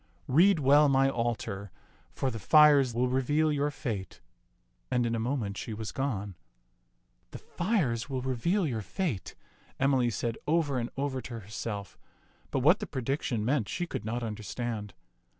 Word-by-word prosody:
Read 175 +8 +5
well 145 +1 +5
my 135 0 +4
altar, 115 -5 -3 0.4
for 135 - -2
the 115 - -5
fires 145 0 +6
will 125 +2 +2
reveal 145 +5 +1
your 145 0 +1
fate 110 -10 -5 0.4
"; - - -44
and 125 -1 +2
in 115 - 0
a 115 - 0
moment 115 -4 -2
she 110 - -5
was 110 0 -5
gone. 105 -8 -3 0.5
" - - -44
*The - - -5
fires 150 - -1
will 130 -2 -3
reveal 165 - 0
your 120 -7 -2
fate,* 120 - -3 0.2
" - - -31
Emily 135 -3 +3
said 115 +1 -3
over 150 -4 +1
and 120 - -3
over 135 -2 -2
to 120 -2 -7
herself, 105 0 -6 0.5
but 135 - -1
what 160 +10 +5
the - - -5
prediction 130 -4 -2
meant 125 -4 +1
she 175 - -2
could 170 - -5
not 120 +3 -3
understand. 110 -1 -4
125 Hz, 170 wpm, -29 LUFS, 110-145 Hz, 0.5 s, fires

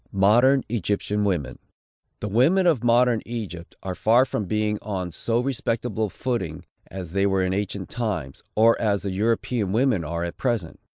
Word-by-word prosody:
MODERN 120 +8 +4
EGYPTIAN 105 -1 -1
WOMEN. 90 -8 -2 0.6
The 105 - -2
women 140 - +3
of 155 -10 +3
modern 120 -1 +4
Egypt 100 -8 -7
are 95 - -3
far 115 +7 +4
from 110 - -3
being 105 +1 -1
on 95 -4 -4
so 115 +8 -1
respectable 120 -4 -1
a - - -5
footing 95 -9 -3 0.2
as 90 -4 -7
they 100 +2 +2
were 95 -1 +1
in 95 0 0
ancient 100 -1 -3
times, 105 - -3
or 115 +2 +5
as 105 -3 +1
the 100 - -2
European 110 0 0
women 115 -6 +2
are 85 +2 -3
at 85 - -5
present. 115 -10 -2
105 Hz, 170 wpm, -24 LUFS, 95-120 Hz, 0.6 s, or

